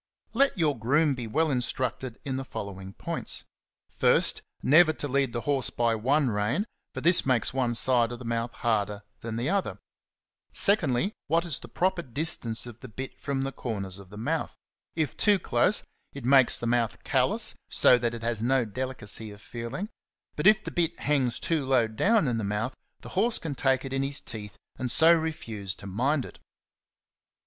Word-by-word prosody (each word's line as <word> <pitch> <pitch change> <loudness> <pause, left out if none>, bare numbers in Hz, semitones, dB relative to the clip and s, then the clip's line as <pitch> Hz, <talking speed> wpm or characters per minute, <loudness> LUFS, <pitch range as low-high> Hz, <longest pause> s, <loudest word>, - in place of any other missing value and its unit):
Let 270 -1 +2
your 150 -7 +1
groom 145 +6 +2
be 125 -3 -5
well 155 +7 +1
instructed 125 -1 -2
in 135 -2 -2
the 135 - -3
following 95 -5 -7
points: - - -4 0.4
first, - - +3 0.2
never 155 +3 +6
to 145 - -1
lead 135 -2 +1
the 120 - -3
horse 140 -2 +2
by 120 -1 +1
one 130 +4 +1
rein,^^ 105 - 0 0.3
for - - -6
this 175 +1 +5
makes 125 -4 +2
one 125 -3 0
side 120 -1 +2
of 120 - -5
the 125 - -10
mouth 115 0 -2
harder 105 -4 -1 0.2
than 115 -1 -5
the 120 +5 -1
other; 200 -1 -1 0.7
secondly, 190 - +2
what 165 +3 +2
is 155 -7 -3
the - - -11
proper 185 -1 0
distance 125 -5 -1
of 120 -2 -10
the 130 - -9
bit 130 +4 -8
from 140 -2 -2
the 135 - -2
corners 100 -7 -4
of 95 -2 -13
the 105 - -11
mouth: 150 +9 -2 0.4
if 155 -5 -1
too 205 -2 +4
close, 170 - +2 0.3
it 140 -4 -8
makes 130 -1 +6
the - - -5
mouth 120 -2 0
callous, - - +2 0.2
so 125 - +5
that 120 0 -1
it 115 - -8
has 115 -2 -1
no 130 +1 +2
delicacy 115 -2 -5
of 100 0 -12
feeling; 120 - -6 0.5
but - - +2
if 215 0 +6
the - - -5
bit 170 -1 -1
hangs 135 -5 +1
too 160 -4 0
low 130 -3 +3
down 195 - +2
in 120 -2 0
the - - -3
mouth, 105 +5 -2 0.3
the - - -9
horse 225 +5 +2
can 160 -3 -4
take 135 0 +1
it 135 - -5
in 135 - 0
his 140 +1 0
teeth 105 -2 -8 0.2
and 130 -1 -2
so 160 +7 +5
refuse 115 - -3
to - - -12
mind 125 +9 0
it. - - -13
130 Hz, 190 wpm, -27 LUFS, 115-150 Hz, 0.7 s, never